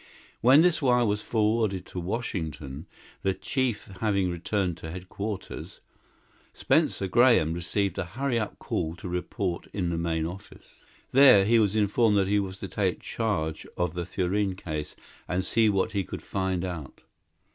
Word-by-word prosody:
When 135 +6 +7
this 175 -3 +3
wire 125 -3 +3
was 105 -1 0
forwarded 105 -4 0
to 90 - -6
Washington, 80 - -4 0.3
the 95 -1 0
chief 120 +3 -1
having 100 -4 +1
returned 90 0 -1
to 80 - -8
headquarters, 95 +3 -6 0.8
Spencer 95 - +1
Graham 115 -6 +4
received 90 +2 -1
a - - -1
hurry 120 +6 -1
up 105 - -4
call 80 +1 -3
to 90 - -8
report 90 0 -3
in 90 -4 -1
the 85 - -1
main 80 -1 -1
office. 90 +4 -10 0.3
There 130 -7 +7
he 115 +2 +4
was 105 -1 +2
informed 105 +1 +3
that 95 -1 +2
he 105 +1 +3
was 95 -1 -4
to 100 - -4
take 95 -2 -1
charge 80 -9 -2
of 90 -2 0
the 85 -1 -4
Thurene 95 +1 0
case 75 -5 -5 0.3
and 90 +1 -1
see 110 -1 +3
what 100 +2 +1
he 100 -2 0
could - - -7
find 95 -2 -1
out. 85 -7 -7
95 Hz, 160 wpm, -27 LUFS, 90-110 Hz, 0.8 s, When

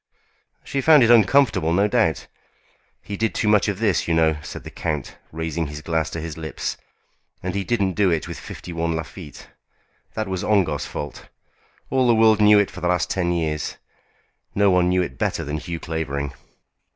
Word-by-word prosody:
"She 140 - -2
found 150 -2 +6
it 115 - +5
uncomfortable, 115 - +4
no 100 +4 +3
doubt. 80 -6 +1 0.8
He 100 - -5
did 110 +2 -1
too 110 - 0
much 105 -1 +4
of 100 -2 -1
this, 100 -7 +1
you 85 - +1
know," 80 -1 +3
said - - -8
the - - -9
count, 75 -5 -4
raising 80 0 -3
his 75 +1 -8
glass 80 -2 -1
to 80 - -5
his 80 -1 -6
lips; 80 -2 -4 0.7
"and 90 0 -2
he 100 0 -1
didn't 100 -4 0
do 100 0 +2
it 80 -3 -1
with - - -7
51 85 -1 -4
Lafitte. 80 0 -8 0.7
That 110 -1 -2
was 95 -2 -3
Ongar's 90 -9 +1
fault. 75 -2 -7 0.6
All 130 -1 +3
the 120 - +5
world 110 -1 +5
knew 105 0 +7
it 100 -1 +2
for 90 - -10
the 90 - 0
last 90 -1 0
ten 90 -2 0
years. 80 -3 -2 0.8
No 100 -1 +4
one 90 -1 +3
knew 90 0 +2
it - - -7
better - - -1
than 75 +2 -3
Hugh 85 +1 -5
Clavering." 70 -4 -3
90 Hz, 190 wpm, -22 LUFS, 80-105 Hz, 0.8 s, knew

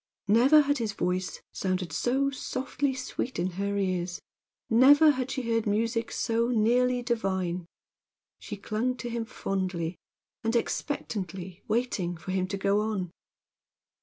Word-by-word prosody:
Never 255 +9 +6
had 285 -1 +1
his 220 -3 -1
voice 185 -1 -2
sounded 185 -2 -2
so 270 +3 +1
softly 265 +1 -2
sweet 255 0 -4
in 180 +2 0
her 200 +3 -2
ears, 185 -2 -1 0.5
never 285 +6 +7
had 260 -2 -2
she 260 -1 -2
heard 230 -1 0
music 230 +2 0
so 230 +1 +1
nearly 245 +2 +2
divine. 190 -7 -1 0.7
She 210 - -7
clung 225 +5 -1
to 240 0 -5
him 230 -1 -2
fondly, 185 -6 -3 0.4
and 225 +1 0
expectantly, 190 - -3
waiting 210 -7 -1
for 185 - -6
him 185 -1 0
to 200 +1 -3
go 200 +1 +2
on. 205 -5 -2
220 Hz, 135 wpm, -28 LUFS, 185-250 Hz, 0.7 s, never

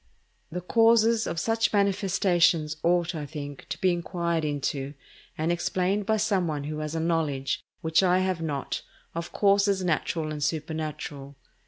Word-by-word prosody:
The 180 +2 -3
causes 225 +3 +4
of 170 - -2
such 225 +5 +1
manifestations 190 -6 +2
ought, 175 +1 +2
I 150 -3 -5
think, 145 -2 -7
to - - -3
be 185 - +3
inquired 170 -1 -1
into 145 -1 -2 0.4
and 160 +2 0
explained 185 +3 0
by 220 -1 +3
some 205 -4 +1
one 150 -2 -2
who 150 +1 -4
has 155 +1 -4
a - - 0
knowledge, 160 -5 0 0.2
which 160 0 +3
I 180 -1 +4
have 185 -2 0
not, 145 -4 -3 0.3
of 170 +1 -5
causes 200 -1 +3
natural 160 -2 -1
and 150 -1 -3
supernatural. 150 -2 -4
170 Hz, 155 wpm, -27 LUFS, 155-190 Hz, 0.4 s, causes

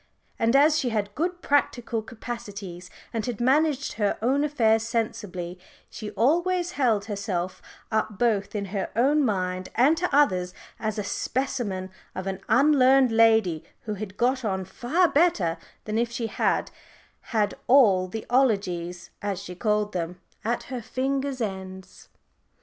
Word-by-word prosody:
And 230 +3 +2
as 300 +2 +5
she 255 - 0
had 205 -3 -2
good 350 - -2
practical 245 -5 +1
capacities, 205 -6 -7 0.2
and 225 -2 -1
had 240 -4 -3
managed 285 +3 +2
her 205 -2 0
own 265 +6 +2
affairs 225 -7 +3
sensibly, 210 -6 -3 0.3
she 215 - -6
always 345 - +2
held 230 - +1
herself 200 -4 -3 0.3
up 220 -2 -1
both 205 -3 +1
in 200 -1 -1
her 195 - -2
own 285 +6 +3
mind 185 -5 -1
and 270 +7 +5
to 360 +2 0
others 185 -11 +2 0.2
as 215 0 -2
a 210 - -1
specimen 205 -6 -2 0.2
of 185 - -4
an 190 -1 -3
_un_learned 270 -2 +5
lady 220 -7 +4 0.2
who 215 - -4
had 205 -1 -7
got 255 +2 +1
on 190 -3 -1
far 255 - +1
better 220 - +2 0.3
than 215 +1 -1
if 235 0 +1
she 235 0 -3
had 225 - 0 0.6
had 210 -2 +2
all 210 -9 +5
the 220 +4 -6
"'ologies," 180 -9 0
as 200 -3 -2
she 195 -2 -8
called 210 +2 0
them, 175 0 -3 0.2
at 235 +2 -1
her 250 - -3
fingers' 270 +2 -2
ends. 190 -2 -6
220 Hz, 150 wpm, -26 LUFS, 195-260 Hz, 0.6 s, as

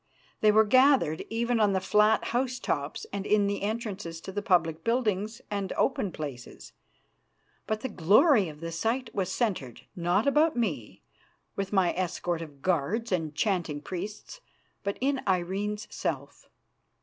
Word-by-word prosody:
They 215 - +5
were 215 +1 +6
gathered 255 - +4
even 235 +1 0
on 205 -2 +3
the 190 - +2
flat 210 +3 +3
house 250 +1 0
tops 145 -10 -3
and 200 -1 -2
in 210 0 +3
the 200 0 -1
entrances 200 -6 -4
to 190 - -7
the 205 +2 -3
public 165 -5 +1
buildings 220 -2 0
and 200 -2 -2
open 195 - 0
places. 140 -7 -8 0.9
But 215 0 -1
the - - -2
glory 205 - +4
of 150 0 -12
the 165 0 -4
sight 225 +10 -2
was 190 -2 -1
centred, 185 - -2
not 175 +4 +1
about 295 +1 +3
me, 155 - -3 0.5
with 195 -1 -3
my 190 -4 +3
escort 175 -2 -2
of 145 -4 -10
guards 185 +7 0
and 160 -5 -1
chanting 170 -6 0
priests, 200 - -7 0.4
but 200 0 -2
in 275 0 +1
Irene's 195 +3 -1
self. - - -4
200 Hz, 150 wpm, -28 LUFS, 170-225 Hz, 0.9 s, were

